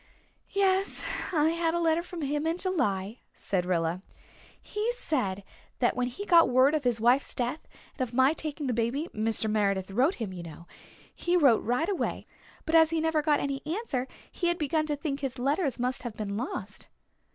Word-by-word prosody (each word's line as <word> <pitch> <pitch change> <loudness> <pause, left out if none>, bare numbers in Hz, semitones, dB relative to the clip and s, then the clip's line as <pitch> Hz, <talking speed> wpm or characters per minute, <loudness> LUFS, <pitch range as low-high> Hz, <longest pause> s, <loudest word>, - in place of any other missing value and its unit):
"Yes, 390 0 +1 0.3
I 315 -2 +3
had 335 0 0
a - - +1
letter 330 0 +2
from 350 -1 -8
him 295 +2 -1
in 330 +1 0
July," 220 - -1 0.2
said 180 -2 -1
Rilla. 170 0 0 0.6
"He 430 +3 -2
said 200 - -2 0.3
that 240 - +2
when 250 0 0
he 325 +12 -6
got 335 -7 +6
word 255 +3 +5
of 305 -2 0
his 240 -2 +1
wife's 245 +5 +2
death 250 +5 -3 0.3
and 255 -3 -3
of - - -16
my 260 +4 +4
taking 305 -2 -5
the 255 - 0
baby 240 +8 -1
Mr. 220 +1 +1
Meredith 200 -3 0
wrote 265 - +2
him, 215 -5 -5
you 180 - -7
know 170 0 -10 0.5
he 350 +1 +1
wrote 275 -9 +5
right 250 +8 0
away, 395 -2 -2 0.4
but 320 - -3
as 320 -1 +7
he 330 0 0
never 320 -1 +1
got 295 -1 +2
any 275 -1 -2
answer 305 - -2 0.2
he 350 - -1
had 345 0 +1
begun 310 0 0
to 295 - 0
think 285 -1 -3
his 270 -2 -4
letter 285 +5 +1
must 250 +1 -1
have 240 -3 -5
been 205 -2 -4
lost." 245 +6 -4
275 Hz, 195 wpm, -28 LUFS, 230-325 Hz, 0.6 s, as